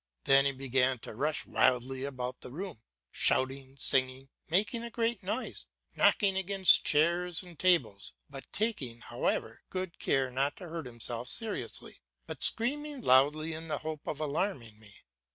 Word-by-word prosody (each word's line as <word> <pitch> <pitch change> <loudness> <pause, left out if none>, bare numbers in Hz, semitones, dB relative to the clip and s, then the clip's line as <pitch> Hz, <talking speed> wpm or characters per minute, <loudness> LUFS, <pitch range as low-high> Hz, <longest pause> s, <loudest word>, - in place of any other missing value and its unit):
Then 135 0 +5
he 140 - +3
began 130 -1 +1
to - - -8
rush 150 +7 -1
wildly 130 +1 +1
about 125 -2 -5
the - - -9
room, 160 - -7 0.3
shouting, 135 +1 +1
singing, 130 0 +1 0.2
making 205 +7 +1
a 235 - -5
great 230 -2 -1
noise, 210 +7 -3 0.3
knocking 195 -3 +4
against 190 -2 +5
chairs 170 +3 +2
and 175 -4 -13
tables, 125 - +1
but 135 -1 -11
taking, 145 - -2
however, - - -2
good 185 -2 -5
care 135 -2 +1
not 135 +3 -1
to 180 - -9
hurt 165 -4 -5
himself 120 +1 -3
seriously, 225 -3 -1 0.2
but - - -8
screaming 285 +4 0
loudly 150 - +4
in 160 +1 -7
the 155 - -2
hope 155 -2 -5
of 150 - -3
alarming 145 - -2
me. 105 -2 -16
150 Hz, 150 wpm, -31 LUFS, 130-185 Hz, 0.3 s, Then